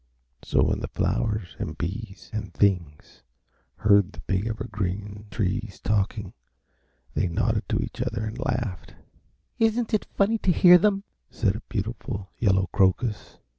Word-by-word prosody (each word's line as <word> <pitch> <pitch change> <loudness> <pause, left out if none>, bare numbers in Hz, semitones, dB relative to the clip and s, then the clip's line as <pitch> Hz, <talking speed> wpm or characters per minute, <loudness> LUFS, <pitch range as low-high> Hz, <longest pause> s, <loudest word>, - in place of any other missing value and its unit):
So - - +2
when - - +1
the - - -3
flowers 105 -6 -1
and 75 - -4
bees 95 +4 -5
and 110 - -4
things 85 -7 0 0.5
heard 100 -2 +4
the - - -11
big 95 +3 -1
Evergreen 105 -1 -4
Trees 105 0 -2
talking 105 -1 -1 0.8
they - - +1
nodded 85 - 0
to - - +1
each - - -4
other 105 - -2
and 110 +3 -5
laughed. 115 -8 -3 0.6
"Isn't 225 +1 +2
it 215 - +1
funny 215 +3 +3
to 190 - +2
hear 180 0 +8
them?" 200 +1 +2 0.3
said 100 -3 0
a 110 - -5
beautiful 105 -2 -4
yellow 95 -4 +3
crocus. 105 +3 +1
105 Hz, 140 wpm, -26 LUFS, 95-115 Hz, 0.8 s, hear